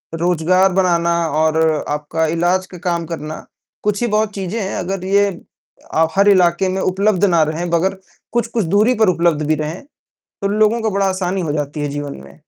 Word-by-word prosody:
रोजगार 180 +3 +2
बनाना 170 -2 +2 0.3
और 160 0 +2 0.3
आपका 150 +2 -1
इलाज 175 +3 +1
का 180 - -11
काम 170 -1 -1
करना 155 -2 -6 0.4
कुछ 210 +1 0
ही 240 - +1
बहुत 215 0 +1
चीज़ें 195 +3 -3
हैं, 195 - -3
अगर 185 0 -3
ये 200 +1 +3 0.7
अ, 160 0 +3
हर 200 +1 +4
इलाके 185 -1 +3
में 190 +1 -2
उपलब्ध 195 +1 +1
ना 170 -4 +3
रहें 160 +3 -2
मगर 190 +3 +1 0.4
कुछ-कुछ 235 -4 0
दूरी 210 +8 +3
पर 195 - +4
उपलब्ध 170 -3 +1
भी 155 - +2
रहें, 155 +3 -4 0.6
तो 200 - 0
लोगों 215 +3 +2
का 220 - 0
बड़ा 200 0 0
आसानी 185 0 -2
हो 155 -4 -2
जाती 150 0 -3
है 145 - -2
जीवन 145 - -6
में। 70 - -17
180 Hz, 190 wpm, -18 LUFS, 160-200 Hz, 0.7 s, हर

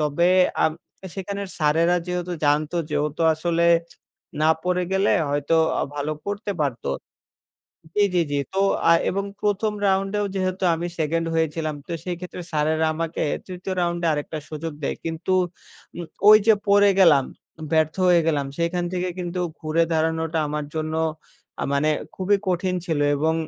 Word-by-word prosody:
তবে 150 +4 +2 0.3
আ - - +4 0.5
সেখানের 200 +1 -5
স্যারেরা 165 +3 +3
যেহেতু 180 0 -3
জানতো 150 +3 +1
যেহেতু 150 +2 -1
আসলে 170 +1 +1 0.7
না 155 - +4 0.2
পড়ে 180 0 +1
গেলে 195 +2 +2 0.2
হয়তো 145 +3 +1 0.2
আ - - 0
ভালো 145 +1 -2
করতে 205 0 -3
পারত 135 -5 -3 1.1
জি, 205 - +5
জি, 175 - +4
জি। 145 - +1 0.2
তো 195 - +1 0.3
আ - - +8 0.2
এবং 200 +1 -2 0.2
১ম, 210 +1 +1 0.2
রাউন্ডেও 195 +2 +1
যেহেতু 185 0 -1
আমি 170 +2 -3
2nd 165 +1 0
হয়েছিলাম। 160 -1 -1
তো - - -6
সেই 180 -1 -3
ক্ষেত্রে 180 0 -7
স্যারেরা 155 +1 +1
আমাকে 165 +1 -3 0.2
৩য়, 185 0 -5
রাউন্ডে 170 0 0
আরেকটা 150 +1 -3
সুযোগ 155 +1 -5
দেয়। - - -2
কিন্তু 165 +3 -3 0.6
উম 175 - -5 0.2
ওই 215 - +11
যে 220 - +7
পড়ে 205 0 +6
গেলাম, 155 -8 +6 0.5
ব্যর্থ 155 -1 +2
হয়ে 175 -1 +6
গেলাম, 145 -4 +1
সেখান 175 +1 0
থেকে 180 0 -1
কিন্তু 180 0 -3 0.2
ঘুরে 155 +1 +1
দাঁড়ানোটা 160 0 0
আমার 150 0 -3
জন্য 155 0 -2 0.7
আ - - 0
মানে 145 +2 +2 0.3
খুবই 195 +2 +2
কঠিন 185 0 0
ছিল, 160 -3 0 0.2
এবং 160 +3 +1
170 Hz, 155 wpm, -23 LUFS, 155-185 Hz, 1.1 s, ওই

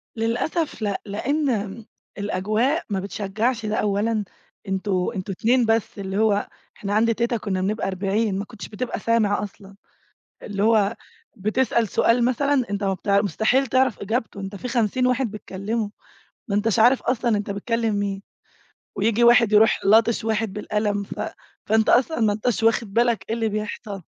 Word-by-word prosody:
للأسف 235 +6 -1
لأ، 200 -2 -1
لأن 220 -2 -2 0.3
الأجواء 215 - 0
ما 195 -2 -1
بتشجّعش 215 +4 -2
ده 210 0 -1
أولًا، 210 +1 0 0.4
أنتم 190 -1 -1
أنتم 195 +1 -4
اتنين 245 +2 +3
بس 225 0 0
اللي 195 0 -3
هو 210 -2 +2 0.3
إحنا 200 0 -3
عند 230 +1 +3
تيتة 235 +1 0
كنا 190 -3 -2
بنبقى 210 +3 -1
40 195 +2 -1
ما 205 - -4
كنتش 225 -2 -9
بتبقى 235 +4 -4
سامع 215 -3 +1
أصلًا، 200 -1 -10 0.7
اللي 200 -1 -2
هو 220 -1 +3 0.4
بتسأل 225 +2 +1
سؤال 235 +5 +2
مثلًا 270 +2 +2
أنت 200 0 -3
مبتع 200 +1 +1
مستحيل 220 - +1
تعرَف 260 -2 +2
إجابته، 220 0 -3
أنت 195 +1 -6
في 250 - -6
50 245 +1 +1
واحد 250 -3 0
بيتكلّموا، 210 +1 -4 0.6
ما 200 - -1
أنتاش 220 +1 +1
عارف 245 +4 +5
أصلًا 240 -3 +1
أنت 205 0 -3
بتكلّم 225 +2 -1
مين، 200 -1 -2 0.7
وييجي 225 +3 +2
واحد 235 -2 +6
يرُوح 215 +1 +5
لاطش 220 +2 +4
واحد 220 -2 -1
بالقلم 210 0 -1
ف 200 - -7 0.5
فأنت 220 +1 +2
أصلًا 255 +2 +3
ما 215 -2 +3
أنتاش 220 +2 -1
واخِد 225 -2 +2
بالك 235 -1 +2
إيه 225 - 0
اللي 225 -1 0
بيحصَل. 210 -1 -5
215 Hz, 155 wpm, -23 LUFS, 200-235 Hz, 0.7 s, واحد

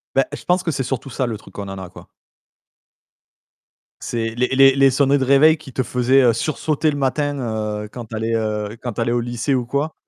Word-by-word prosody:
Bah, 135 - +4
je - - -7
pense 180 +1 +2
que 165 - -1
c'est 135 - -2
surtout 130 +1 -4
ça, 130 +1 -2
le 115 -3 -3
truc - - -17
qu'on 100 -1 -6
en 95 - -6
a, 95 -1 -8
quoi. - - -14 2.0
C'est 115 -1 -2
les 125 +1 0
les 135 0 +5
les 135 0 +5
sonneries 140 +1 +2
de - - 0
réveil 140 +4 +5
qui 150 -3 -13
te 130 - 0
faisaient, 125 +3 +2
heu, 120 -2 +5
sursauter 155 +5 -1
le 145 - -2
matin, 145 +1 -1 0.5
heu, - - -7
quand 120 +2 -9
tu 110 0 -8
allais, 110 +1 -2
heu, 105 -1 -2
quand 120 -2 -4
tu 115 - -3
allais 115 - 0
au 120 - +1
lycée 120 +3 -2
ou 125 - +1
quoi. 145 +5 -1
130 Hz, 230 wpm, -20 LUFS, 115-140 Hz, 2.0 s, les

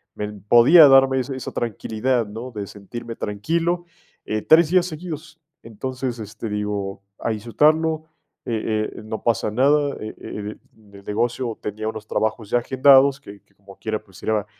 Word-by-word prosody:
me 105 - -3
podía 120 - +7
darme 135 -1 +5
esa 130 +1 -3
esa 130 - -6
tranquilidad, 115 +2 -1
¿no?, 110 +5 -7
de 105 -4 -6
sentirme 115 +4 -8
tranquilo, 165 - -1 0.4
eh, 110 0 -2
3 160 +4 +5
días 180 -1 +3
seguidos. 160 -1 -8 0.2
Entonces, 125 +2 -5
este, 110 +2 -7
digo: 105 -2 -3 0.2
"A - - -1
disfrutarlo, 155 +8 +1 0.4
eh 110 -2 -1
eh, - - -8
no 110 0 -5
pasa 110 -3 +1
nada". 140 +4 +3
Eh 110 0 -7
eh, - - -10 0.3
el - - -26 0.3
el 100 0 -13
negocio 115 +2 -2
tenía 110 +1 -4
unos 110 -1 -8
trabajos 110 -1 -2
ya 120 - +3
agendados, 135 +2 +5
que 100 -7 -13
que - - -36
como 100 0 -16
quiera, 110 -1 -3
pues, 95 -3 -17
era 110 -2 0
115 Hz, 165 wpm, -22 LUFS, 105-135 Hz, 0.4 s, podía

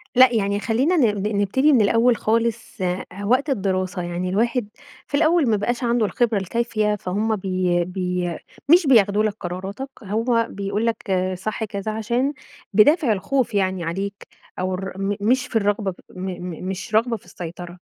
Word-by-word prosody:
.لأ 255 0 +7
يعني 200 -2 +1
خلّينا 260 +12 +1
ن 210 -8 +2
ن 215 - -1
نبتدي 265 +9 +3
من 240 - +5
الأوّل 230 +4 +4
خالص. 230 -1 -1
آآ 180 0 -1 0.2
وقت 260 +7 +2
الدراسة 190 -5 -1
يعني 175 +1 -3
الواحد 230 +3 0 0.4
في 285 - 0
الأوّل 320 -2 +3
ما 215 - +3
بقاش 240 +5 -2
عنده 235 -1 +2
الخبرة 230 +1 +1
الكافية، 215 +1 0
فهمّ 210 +3 -1
بي 185 -2 0
بي 180 -2 -2 0.3
مش 340 0 +6
بياخدوا 210 -5 +5
لَك 215 -1 0
قراراتك، 190 +9 -5
هو 230 +3 +1
بيقول 200 +3 -2
لَك 225 -3 -2 0.3
صح 215 +4 -3
كذا، 200 0 -4
عشان 240 +6 -1 0.4
بدافع 275 - +5
الخوف 250 +5 -1
يعني 190 -3 0
عليك، 195 +4 -4 0.3
أو 185 0 -1
ر 190 +1 -5
م 195 +1 -1
مش 255 +6 +2
في - - -11
الرغبة 205 -2 +1 0.2
م 180 - -10
م 180 -1 -7
مش 190 +3 -4
رغبة 230 +1 +2
في 190 - -22
السيطرة. 175 0 -8
210 Hz, 165 wpm, -22 LUFS, 190-235 Hz, 0.4 s, لأ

